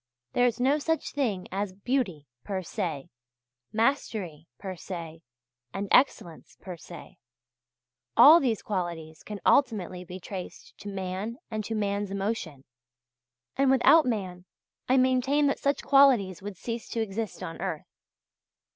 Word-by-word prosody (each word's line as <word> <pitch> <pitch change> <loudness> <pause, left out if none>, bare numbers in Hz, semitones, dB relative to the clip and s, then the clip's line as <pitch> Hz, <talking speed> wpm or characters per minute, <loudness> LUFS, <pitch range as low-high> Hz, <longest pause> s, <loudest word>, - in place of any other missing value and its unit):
There 245 0 +4
is 235 0 -2
no 275 +4 +3
such 325 +2 -1
thing 225 -10 -2
as 195 0 -3
beauty 200 - -2 0.2
per 190 -2 -3
se, 165 -7 -4 0.6
mastery 215 - -1
per 190 -2 -6
se, 165 -2 -8 0.5
and 200 +1 -3
excellence 175 - +1
per 185 -2 -8
se. 170 0 -12 1.0
All 315 +4 +10
these 240 - -1
qualities 170 -5 -4
can 210 -1 -7
ultimately 195 -9 +2
be 180 +1 -9
traced 185 0 -8
to 205 - -7
man 195 +4 -4
and 215 -1 -2
to 225 - -3
man's 205 -1 -1
emotion; 195 -8 -3 0.9
and 275 0 +3
without 270 +3 +6
man 185 -6 -3 0.4
I 260 - +4
maintain 260 +3 +3
that 280 - +1
such 280 0 0
qualities 255 -10 +4
would 200 -1 -7
cease 230 +2 -5
to 230 - -3
exist 220 0 -4
on 165 - -7
earth. - - -3
205 Hz, 140 wpm, -27 LUFS, 180-250 Hz, 1.0 s, All